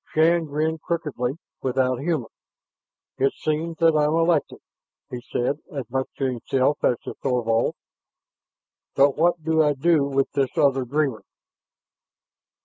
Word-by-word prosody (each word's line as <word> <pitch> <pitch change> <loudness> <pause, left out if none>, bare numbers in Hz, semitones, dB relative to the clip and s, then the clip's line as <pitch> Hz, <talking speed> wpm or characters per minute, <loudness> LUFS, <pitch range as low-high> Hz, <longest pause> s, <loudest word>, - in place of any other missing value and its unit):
Shann 165 +1 +4
grinned 155 +2 -2
crookedly, 150 -8 -2 0.3
without 130 -1 0
humor. 145 -6 -2 0.9
"It 135 +1 +2
seems 160 +2 -2
that 165 -1 +4
I'm 150 +1 +2
elected," 165 -2 +1 0.5
he 125 - -5
said 125 +4 -2
as 135 -6 -5
much 130 0 -1
to 135 - -1
himself 130 +3 0
as 120 - +3
to - - -6
Thorvald. 120 -4 +1 1.2
"But 140 0 +4
what 170 0 +1
do 160 0 +2
I 150 -1 +3
do 155 +1 +2
with 135 -1 0
this 135 -2 -1
other 135 -2 +3
dreamer?" 135 -3 -1
145 Hz, 135 wpm, -24 LUFS, 130-160 Hz, 1.2 s, Shann